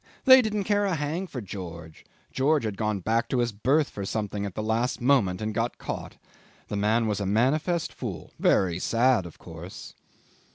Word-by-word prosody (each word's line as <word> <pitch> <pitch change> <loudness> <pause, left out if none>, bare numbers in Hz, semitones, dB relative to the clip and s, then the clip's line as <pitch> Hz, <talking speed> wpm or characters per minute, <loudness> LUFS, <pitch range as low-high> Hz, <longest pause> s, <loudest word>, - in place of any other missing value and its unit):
They 260 -1 +9
didn't 210 -3 -1
care 205 +1 +1
a 190 -3 0
hang 160 +5 -2
for 130 -7 -6
George. 85 -5 -9 0.2
George 145 +2 +2
had 110 -3 -2
gone 105 -2 -1
back 115 +5 0
to 130 - 0
his 120 -1 +1
berth 135 +9 +2
for 100 - -5
something 105 0 -3
at 95 - -9
the 110 - -3
last 115 +3 0
moment 115 -8 +2
and 110 0 -2
got 115 +2 -1
caught. - - -6 0.5
The - - -3
man 110 +3 +2
was 105 -2 -1
a 100 - -2
manifest 150 - +1
fool. 95 - -6
Very 90 -2 +2
sad, 115 -3 +2
of 85 - -13
course. 85 +2 -10
110 Hz, 190 wpm, -26 LUFS, 100-140 Hz, 0.5 s, They